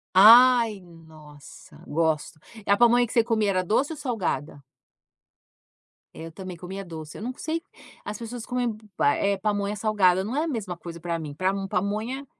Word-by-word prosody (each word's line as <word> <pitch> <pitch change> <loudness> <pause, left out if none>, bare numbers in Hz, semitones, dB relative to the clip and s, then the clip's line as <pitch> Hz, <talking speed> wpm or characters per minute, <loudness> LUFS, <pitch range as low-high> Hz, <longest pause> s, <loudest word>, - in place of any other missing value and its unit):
Ai, 230 +1 +7
nossa, 160 -4 -15
gosto. 160 0 -1 0.3
É - - 0
a 200 - +5
pamonha 240 +1 +5
que 230 - -9
você 230 - +4
comia 220 -3 0
era 185 -1 0
doce 260 - 0
ou - - -10
salgada? 180 - -3 1.5
Eu 165 0 -9
também 185 +1 -8
comia 190 +3 -7
doce, 160 -4 -9
eu - - -9
não 245 +4 -4
sei, 325 +1 -3 0.4
as 210 - -6
pessoas 235 +1 -7
comem, 250 -1 -1
hum, 215 - -6 0.2
pa 145 - +3
eh, 200 0 0
pamonha 205 0 -1
salgada, 195 -4 +2
não 220 +6 -4
é 300 - +1
a - - -3
mesma 215 - -4
coisa 170 0 -9
para 170 0 -3
mim. 150 -3 -7
Para 185 +4 0
mo 195 -1 -4
pamonha 215 +9 -2
200 Hz, 185 wpm, -25 LUFS, 170-230 Hz, 1.5 s, Ai